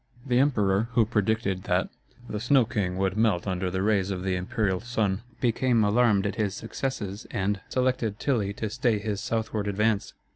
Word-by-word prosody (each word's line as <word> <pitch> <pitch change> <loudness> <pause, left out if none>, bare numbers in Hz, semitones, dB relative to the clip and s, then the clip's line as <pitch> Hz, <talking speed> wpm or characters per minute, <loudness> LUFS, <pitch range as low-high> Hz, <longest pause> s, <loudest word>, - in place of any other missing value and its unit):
The 125 -2 +2
emperor, 110 -6 +2
who 115 - +4
had 110 +1 0
predicted 105 -3 0
that - - +1 0.4
"the 105 - -4
Snow 125 +2 +4
king 100 -6 -2
would 95 0 0
melt 110 -5 +2
under 95 -1 -1
the 95 +1 -1
rays 100 -2 +2
of 95 -2 -3
the 95 -1 0
Imperial 95 0 -1
sun," 105 -4 -1 0.2
became 120 -1 +2
alarmed 105 -1 +3
at 100 - -2
his 105 -3 0
successes 110 -3 -4
and 100 -2 -1
selected 125 -5 0
Tilly 110 -8 0
to 110 0 -4
stay 120 -2 +1
his 105 -1 -3
southward 110 -2 -2
advance. 105 +1 0
105 Hz, 180 wpm, -27 LUFS, 95-115 Hz, 0.4 s, who